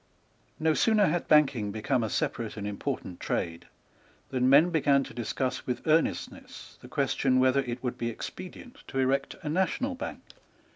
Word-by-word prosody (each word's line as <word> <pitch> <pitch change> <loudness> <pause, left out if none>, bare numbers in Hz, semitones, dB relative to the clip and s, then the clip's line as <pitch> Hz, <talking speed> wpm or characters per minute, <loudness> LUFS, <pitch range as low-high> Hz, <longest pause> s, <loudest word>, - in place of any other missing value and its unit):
No 160 0 +3
sooner 215 +3 +4
had 170 +2 -1
banking 135 -9 +4
become 120 +5 0
a 110 - -1
separate 115 +2 -2
and 100 - -4
important 100 -3 -4
trade, 85 0 -3 0.6
than 130 -1 +1
men 150 +6 +6
began 140 -4 +3
to - - -10
discuss 130 +2 -3
with 125 - -3
earnestness 160 +1 -1
the - - -11
question 130 -1 +1
whether 130 +1 +4
it 125 -2 -4
would 125 - -3
be 115 - -1
expedient 185 - -8
to 135 - -6
erect 135 +1 +1
a 150 - -3
national 190 - 0
bank. 260 - -6
135 Hz, 160 wpm, -28 LUFS, 120-155 Hz, 0.6 s, men